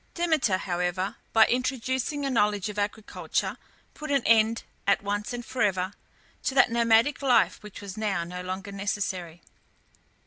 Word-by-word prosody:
Demeter, 315 - +2
however, 180 +2 -2
by 225 -1 +7
introducing 260 +3 -1
a 275 - -1
knowledge 210 -3 +1
of 210 0 -5
agriculture, 205 +1 -2 0.4
put 305 0 -8
an 280 -3 +2
end, 225 0 +4 0.2
at 200 0 +3
once 205 +1 -2
and 240 -1 -5
for 260 - -4
ever, 190 -1 +1 0.5
to 265 - -2
that 270 -3 +5
nomadic 235 +4 +3
life 265 -3 +3
which 210 -2 -10
was 200 0 -8
now 200 -5 -1
no 180 +1 -6
longer 190 +2 -5
necessary. 190 -4 -3
210 Hz, 150 wpm, -27 LUFS, 195-245 Hz, 0.5 s, by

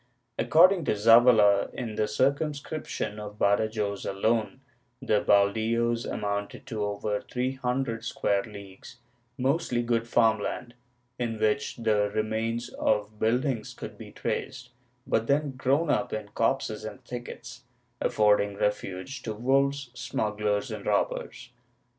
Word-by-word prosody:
According 175 +1 +5
to - - +2
Zavala, 110 -2 +6
in 115 -3 -4
the 105 0 0
circumscription 140 -1 -1
of 105 0 -8
Badajoz 100 0 +1
alone, 110 +4 0 0.4
the 105 -1 +1
haldios 115 +4 +2
amounted 100 0 -3
to 110 -5 -3
over 105 0 -2
three 125 +1 -2
hundred 125 -3 -2
square 100 -1 0
leagues, 100 -2 -11 0.4
mostly 130 -2 0
good 115 -1 0
farm 115 -2 +3
land, 120 +3 -4 0.5
in 115 -2 -2
which 110 +5 0
the 105 -3 +1
remains 110 +2 -2
of 105 0 -1
buildings 120 0 0
could - - -8
be - - -11
traced, 130 -2 -4 0.3
but 115 0 0
then 145 0 +1
grown 135 +5 +1
up 125 - 0
in 105 -1 -4
copses 110 -2 -1
and 125 +4 -8
thickets, 120 0 -8 0.4
affording 105 -1 +3
refuge 105 +5 -3
to 110 -3 -4
wolves, 135 +2 +1
smugglers 105 -3 -2
and - - -6
robbers. 120 - -1
115 Hz, 125 wpm, -27 LUFS, 105-125 Hz, 0.5 s, Zavala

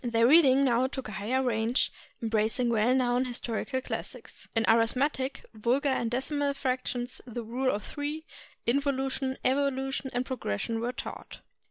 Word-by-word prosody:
Their 230 -1 +3
reading 275 -1 +7
now 250 0 +3
took 265 -1 -6
a - - -6
higher 230 +7 0
range, 230 0 +1 0.3
embracing 225 +2 +1
well 230 +2 +3
known 250 0 +2
historical 250 +2 -2
classics. - - -7
In 225 - +3
arithme 230 +6 +3
tic, 265 0 -5
vulgar 245 +6 +1
and 240 -3 0
decimal 280 +3 0
fractions, 255 -2 -2
the 240 0 -5
rule 250 +4 -1
of 205 -2 -1
three, 300 +2 -4 0.4
invo 280 +4 +2
lution, 265 0 -2
evolution, 270 0 0
and 245 +1 -1
progression 225 - -2
were 235 +2 -1
taught. 250 - -8
255 Hz, 155 wpm, -29 LUFS, 230-270 Hz, 0.4 s, reading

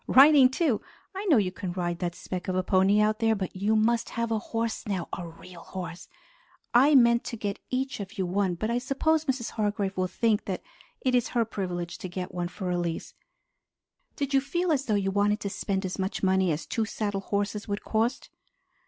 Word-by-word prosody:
Riding, 275 -1 +8
too. 265 -4 +1 0.3
I 390 +2 -5
know 320 -9 +5
you 190 -4 +2
can 185 -1 -5
ride 175 -1 -2
that 175 -2 -2
speck 180 -1 -6
of 185 - -1
a 185 - +1
pony 190 +2 +4
out 215 +1 +2
there, 225 -1 +3
but 190 -2 -4
you 205 +4 +1
must 230 +2 +2
have 230 0 0
a 220 - +1
horse 225 +1 -3
now, 190 -5 -2
a 175 - -6
real 170 +1 -12
horse. 175 -2 -7 0.7
I 275 +5 +6
meant 235 -2 +5
to 235 - -4
get 205 -2 -3
each 265 0 -2
of 195 -1 -7
you 190 - 0
one 185 0 0
but 215 +6 -2
I 240 - +1
suppose 305 +5 +1
Mrs. 260 -4 -1
Hargrave 205 -2 -1
will 185 0 0
think 220 +2 +1
that 190 -2 -4 0.4
it 255 - +1
is 245 -2 +3
her 230 - +3
privilege 175 -5 -4
to 185 - -6
get 180 +1 -5
one 175 -1 -2
for 180 0 -4
Elise." 175 -2 -2 1.0
"Did 280 -1 -2
you 270 - +5
feel 345 +6 -1
as 280 -3 +1
though 215 - +1
you 195 -1 +1
wanted 205 +2 +2
to 200 - -3
spend 195 -1 -2
as 185 +1 -4
much 190 +2 -2
money 190 -1 +3
as 155 +2 -3
two 225 - -1
saddle 205 -2 -2
horses 205 +1 -2
would 205 0 -3
cost?" 230 +5 -1
205 Hz, 215 wpm, -27 LUFS, 185-235 Hz, 1.0 s, Riding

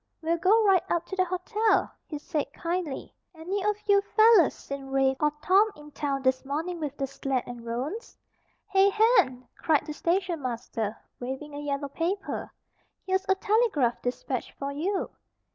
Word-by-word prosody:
We'll 335 +1 +1
go 425 +6 +4
right 385 -3 +5
up 345 0 0
to 385 - -6
the 370 -1 +2
hotel," 395 +5 +1 0.2
he 300 - -5
said, 290 -1 -3
kindly. 340 -4 -3 0.2
"Any 370 +5 -3
of 420 0 +2
you 400 -1 +5
fellows 435 - +5
seen 275 -1 -7
Rafe 270 0 +2
or 300 0 +3
Tom 395 +4 +5
in 295 0 -13
town 275 -2 -2
this 260 0 +2
morning 320 +6 -3
with 290 -2 -4
the 275 - -1
sled 270 -1 -2
and 245 -1 -8
roans?" 260 - -5 0.5
"Hey, 390 0 +5
Hen!" 400 - +3
cried 310 -3 +1
the 300 - -5
station 345 0 0
master, 230 -4 -3 0.2
waving 265 +4 -5
a 290 - -5
yellow 285 -1 -3
paper. 355 +7 -3 0.5
"Here's 380 0 0
a 385 - +5
telegraph 395 - +1
despatch 250 0 -3
for 280 0 -4
you." 365 +8 -2
315 Hz, 165 wpm, -27 LUFS, 275-385 Hz, 0.5 s, right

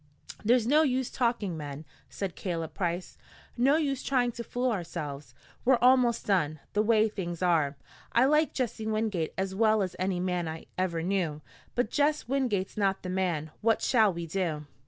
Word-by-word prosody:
"There's 235 +1 +4
no 295 +6 +5
use 260 -4 0
talking, 230 -7 0
men," 145 0 -7 0.2
said 195 -3 -4
Caleb 165 -4 -4
Price, 175 0 -3 0.4
"no 265 +4 +4
use 285 -4 0
trying 250 -3 +1
to 235 0 -6
fool 245 +1 -1
ourselves. 150 - -5 0.3
We're 255 0 +5
almost 250 -2 +4
done, 155 -6 +1
the 210 - +3
way 220 0 +4
things 180 -4 -4
are. 155 -5 +2 0.3
I 240 +2 +4
like 300 +3 +3
Jess 240 -4 -2
Wingate 215 -6 -1
as 190 0 -1
well 215 0 +3
as 185 - -4
any 185 -1 0
man 180 -2 -1
I 160 0 -6
ever 170 -3 -1
knew, 175 -5 -1 0.3
but 240 -3 0
Jess 295 -1 +1
Wingate's 240 -9 -1
not 195 -2 +1
the 180 - -4
man. 175 -5 -1
What 225 0 +2
shall 220 -5 +4
we 170 -1 -5
do?" 165 -3 -2
195 Hz, 175 wpm, -29 LUFS, 170-240 Hz, 0.4 s, no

